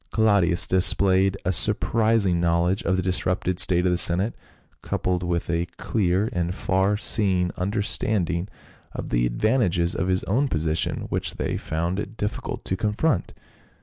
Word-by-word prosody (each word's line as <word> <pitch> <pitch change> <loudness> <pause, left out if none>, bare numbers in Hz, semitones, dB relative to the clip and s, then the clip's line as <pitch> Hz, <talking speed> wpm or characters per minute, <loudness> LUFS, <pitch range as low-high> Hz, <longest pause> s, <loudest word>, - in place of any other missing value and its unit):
Claudius 100 -6 +3
displayed 95 +1 +3
a 90 - +1
sur 90 - +4
prising 110 -6 +1
knowledge 85 +2 +1
of 95 - +1
the 90 - -1
disrupted 90 0 -1
state 90 0 +4
of 90 - +2
the 90 - +3
senate, 90 +7 +5 0.5
coupled 90 -1 -2
with 85 -1 -2
a 85 +1 -1
clear 95 0 0
and 90 -1 -2
far 95 +2 0
seeing 95 -5 0
understanding 95 -2 -2 0.5
of - - -6
the - - +1
advantages 90 - 0
of 90 - -2
his 95 0 0
own 130 +9 0
position, 80 - -2
which - - -3
they - - -3
found 85 +4 -3
it 105 +2 -7
difficult 105 - -5
to 95 - -1
confront. 105 - -1
95 Hz, 150 wpm, -23 LUFS, 85-100 Hz, 0.5 s, senate